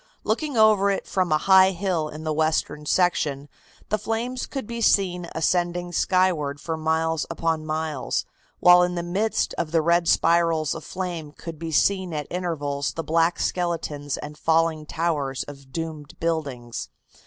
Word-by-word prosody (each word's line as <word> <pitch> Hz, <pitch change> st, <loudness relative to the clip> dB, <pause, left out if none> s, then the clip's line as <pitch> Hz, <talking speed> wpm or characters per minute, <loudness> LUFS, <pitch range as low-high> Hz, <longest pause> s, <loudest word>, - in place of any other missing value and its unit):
Looking 295 Hz, -6 st, -1 dB
over 215 Hz, -2 st, +5 dB
it 195 Hz, -, -1 dB
from 185 Hz, -3 st, -1 dB
a 155 Hz, -, +5 dB
high 190 Hz, +3 st, +6 dB
hill 180 Hz, -4 st, -1 dB
in 155 Hz, +1 st, -8 dB
the 155 Hz, -1 st, -1 dB
western 150 Hz, -1 st, 0 dB
section, 150 Hz, -6 st, +1 dB, 0.4 s
the 215 Hz, -, 0 dB
flames 230 Hz, +4 st, -3 dB
could 270 Hz, -4 st, -5 dB
be 235 Hz, +1 st, -5 dB
seen 180 Hz, -5 st, +2 dB
ascending 175 Hz, +2 st, 0 dB
skyward 175 Hz, -6 st, +1 dB
for 160 Hz, +2 st, -3 dB
miles 160 Hz, 0 st, 0 dB
upon 160 Hz, -2 st, -1 dB
miles, 155 Hz, -3 st, -2 dB, 0.3 s
while 180 Hz, 0 st, +7 dB
in 180 Hz, 0 st, +1 dB
the 170 Hz, -, -2 dB
midst 195 Hz, +6 st, 0 dB
of 170 Hz, -, -1 dB
the 165 Hz, -1 st, +2 dB
red 170 Hz, +1 st, +3 dB
spirals 165 Hz, -3 st, +3 dB
of -, -, -7 dB
flame 170 Hz, -5 st, -5 dB
could 165 Hz, 0 st, -9 dB
be 165 Hz, 0 st, -4 dB
seen 185 Hz, +1 st, +1 dB
at 150 Hz, -1 st, -3 dB
intervals 145 Hz, -6 st, -2 dB
the 165 Hz, -, -4 dB
black 165 Hz, +2 st, +2 dB
skeletons 160 Hz, -5 st, -2 dB
and 150 Hz, 0 st, -8 dB
falling 160 Hz, -1 st, +1 dB
towers 145 Hz, -6 st, -1 dB
of 140 Hz, -2 st, -12 dB
doomed 155 Hz, -3 st, -6 dB
buildings. 140 Hz, -8 st, -3 dB
165 Hz, 160 wpm, -24 LUFS, 155-180 Hz, 0.4 s, while